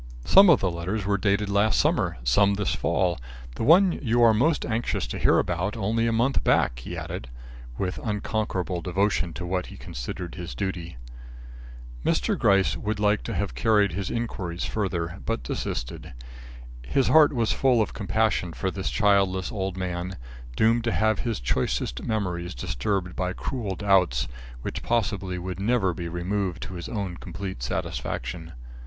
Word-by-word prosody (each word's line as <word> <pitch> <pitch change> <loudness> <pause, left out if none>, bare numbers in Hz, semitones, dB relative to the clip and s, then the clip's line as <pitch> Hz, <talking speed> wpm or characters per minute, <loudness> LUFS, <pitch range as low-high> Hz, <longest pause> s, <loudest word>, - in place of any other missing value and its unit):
"Some 195 0 +8
of 160 - +6
the 95 - +1
letters 90 +5 -3
were 100 0 +1
dated 105 0 +1
last 100 +2 +2
summer, - - +1
some 100 +12 +4
this 100 -1 0
fall. 90 -5 0 0.3
The - - -7
one 180 - +6
you 120 -6 +1
are 115 -1 +7
most 145 +9 +2
anxious 115 +1 -1
to - - -5
hear - - +4
about 90 +6 -1
only 115 +2 +1
a - - +2
month 120 +4 +1
back," - - +2
he 65 - -7
added, 65 - -6 0.5
with 95 -1 -2
unconquerable 105 -4 -2
devotion 95 0 0
to 90 - -5
what 90 +1 -2
he - - -11
considered 85 +8 -6
his 90 -1 -7
duty. 85 -6 -4 1.1
Mr. - - +1
Gryce 100 -1 +3
would 105 0 -3
like 105 0 +2
to - - -3
have - - -2
carried 105 - +3
his 95 +2 -3
inquiries 95 -7 -3
further, 90 -4 -2
but 115 +1 -2
desisted. - - -4 0.7
His 125 - +1
heart 155 -2 +7
was 115 -4 0
full 130 -3 +3
of 110 - 0
compassion 100 -3 0
for 95 +2 -2
this 95 0 -3
childless 100 -3 +2
old 95 -2 -3
man, 90 0 -3 0.4
doomed 115 - +3
to 120 - +1
have 110 +3 +2
his 115 -3 -2
choicest - - -1
memories 90 -6 -2
disturbed 90 +10 -2
by 90 0 -1
cruel 105 -4 -3
doubts 90 -10 +2 0.4
which - - -4
possibly 100 -5 -1
would 90 +1 -5
never 100 -3 +2
be 85 +1 -5
removed 90 +1 -2
to - - -7
his 85 -1 -6
own 100 -6 -3
complete 95 -9 -6
satisfaction. 80 +6 -4
95 Hz, 165 wpm, -26 LUFS, 90-110 Hz, 1.1 s, Some